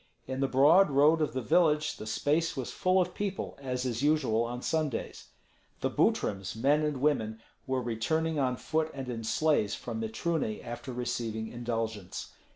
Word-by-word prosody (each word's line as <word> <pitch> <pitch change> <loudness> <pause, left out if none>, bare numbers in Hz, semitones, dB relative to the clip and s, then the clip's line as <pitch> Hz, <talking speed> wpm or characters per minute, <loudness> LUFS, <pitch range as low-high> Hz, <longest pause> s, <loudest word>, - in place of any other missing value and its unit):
In 130 0 -4
the 135 - +2
broad 150 +9 +6
road 150 +4 +4
of 150 - 0
the 130 -1 -2
village 150 +3 +3
the 110 - -7
space 150 +8 0
was 130 - -3
full 185 +1 +2
of 180 -1 0
people, 200 -2 -3
as 125 -1 -2
is 120 -1 -2
usual 135 -7 +2
on 125 +1 -5
Sundays. 155 -6 -2 0.5
The - - 0
Butryms, 95 -1 0
men 140 +7 +3
and 150 -2 -1
women, 110 -7 +1 0.3
were 130 -1 0
returning 155 +8 0
on 130 -2 +1
foot 160 +3 -1
and 135 -2 -5
in 115 -2 -4
sleighs 110 -2 +1
from 115 -2 -5
Mitruny 110 +1 -2
after 120 +3 -6
receiving 120 -3 -3
indulgence. 115 -5 -4
130 Hz, 165 wpm, -30 LUFS, 115-155 Hz, 0.5 s, broad